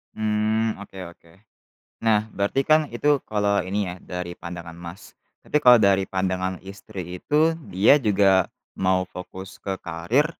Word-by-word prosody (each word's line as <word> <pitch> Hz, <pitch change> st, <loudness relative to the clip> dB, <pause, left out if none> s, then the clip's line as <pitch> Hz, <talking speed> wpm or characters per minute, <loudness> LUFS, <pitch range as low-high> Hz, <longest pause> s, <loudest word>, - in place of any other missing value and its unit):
Mmm, 110 Hz, +1 st, 0 dB
oke 100 Hz, -1 st, -11 dB
oke. 85 Hz, -1 st, -22 dB, 0.7 s
Nah 110 Hz, -1 st, +2 dB
berarti 100 Hz, +7 st, 0 dB
kan 155 Hz, -1 st, +3 dB
itu 145 Hz, +4 st, +1 dB
kalau 100 Hz, -2 st, +1 dB
ini 95 Hz, +3 st, -3 dB
ya, 90 Hz, -, -5 dB
dari 90 Hz, -1 st, -5 dB
pandangan 85 Hz, -1 st, -8 dB
Mas, 85 Hz, +3 st, -11 dB, 0.3 s
tapi -, -, -1 dB
kalau 125 Hz, -1 st, +8 dB
dari 100 Hz, -2 st, +3 dB
pandangan 95 Hz, -1 st, -2 dB
istri 95 Hz, -2 st, -8 dB
itu 155 Hz, +2 st, +3 dB, 0.2 s
dia 95 Hz, +8 st, +5 dB
juga 100 Hz, -3 st, +3 dB, 0.3 s
mau 95 Hz, 0 st, +1 dB
fokus 95 Hz, +1 st, -9 dB
ke 95 Hz, -1 st, -3 dB
karir 85 Hz, -, 0 dB
100 Hz, 145 wpm, -24 LUFS, 90-110 Hz, 0.7 s, kalau